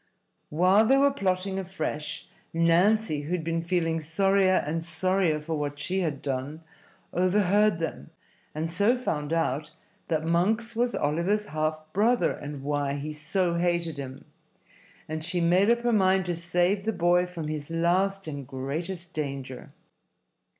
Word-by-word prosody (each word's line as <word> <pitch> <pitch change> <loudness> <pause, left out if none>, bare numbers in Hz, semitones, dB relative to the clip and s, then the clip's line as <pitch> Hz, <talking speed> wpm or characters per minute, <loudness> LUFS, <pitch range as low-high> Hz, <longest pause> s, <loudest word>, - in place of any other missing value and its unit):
While 185 +7 +4
they 270 +2 +5
were 280 +1 +4
plotting 190 -5 -1
afresh 160 -5 -4 0.3
Nancy, 170 +1 +3
who 150 +5 -4
had 175 -3 -1
been 165 +1 -1
feeling 165 -1 0
sorrier 190 +4 +2
and 165 +2 -2
sorrier 175 -1 +1
for 155 +2 -5
what 145 0 -3
she 185 +6 -1
had 155 -7 -2
done, 140 +4 -3 0.5
overheard 200 +2 +3
them, 165 -1 -5 0.5
and 160 +2 -2
so 205 +8 +3
found 150 -11 -3
out 155 -2 0 0.4
that 160 -1 -1
Monks 215 +8 +1
was 240 +1 +1
Oliver's 170 +8 0
half 155 -2 -2
brother 230 +5 +3
and 145 -2 -7
why 145 -1 -1
he 145 +2 -4
so 170 +4 -1
hated 170 -2 0
him; 135 0 -7 0.8
and 155 0 -4
she 180 +2 -1
made 180 +5 +3
up 235 0 +3
her 240 0 +1
mind 190 -2 +3
to 175 -1 -1
save 175 +3 +1
the 225 +1 -1
boy 175 0 +3
from 170 -4 -6
his 150 -1 -4
last 185 +4 +1
and 140 -4 -6
greatest 165 +7 -4
danger. 135 -4 -5
170 Hz, 150 wpm, -27 LUFS, 155-190 Hz, 0.8 s, they